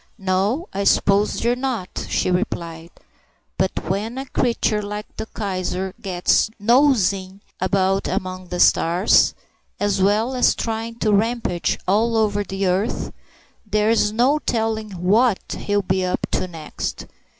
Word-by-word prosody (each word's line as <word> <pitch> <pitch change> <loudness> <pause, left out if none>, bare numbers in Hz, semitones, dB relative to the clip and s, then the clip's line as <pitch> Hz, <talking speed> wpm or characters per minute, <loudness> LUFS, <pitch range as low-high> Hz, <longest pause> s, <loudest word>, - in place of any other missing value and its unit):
"No, 200 - 0
I 200 - -1
suppose 200 +1 +3
they're 235 +1 +1
not," 245 -7 -4
she - - 0
replied, 170 -3 -3 0.7
"but 190 -3 -1
when 210 +7 -2
a 270 - -4
creature 235 -4 0
like 210 +1 -5
that 220 - -6
Kaiser 190 -2 -3
gets 185 +2 +2
nosing 205 -6 +2 0.2
about 190 +1 +1
among 185 0 -4
the 180 0 -4
stars, 175 +3 +4 0.4
as 205 -1 0
well 215 +6 +2
as 250 - +3
trying 225 0 -3
to 215 -2 0
rampage 215 -4 0
all 225 +4 +2
over 205 -2 +1
the 195 0 -3
earth, 190 +5 -1 0.5
there's 215 0 +2
no 250 +7 +2
telling 220 -4 -1
what 200 +5 +2
he'll 205 -1 -1
be 185 0 0
up 180 - -1
to - - -1
next. 160 -3 -6
205 Hz, 135 wpm, -21 LUFS, 185-225 Hz, 0.7 s, stars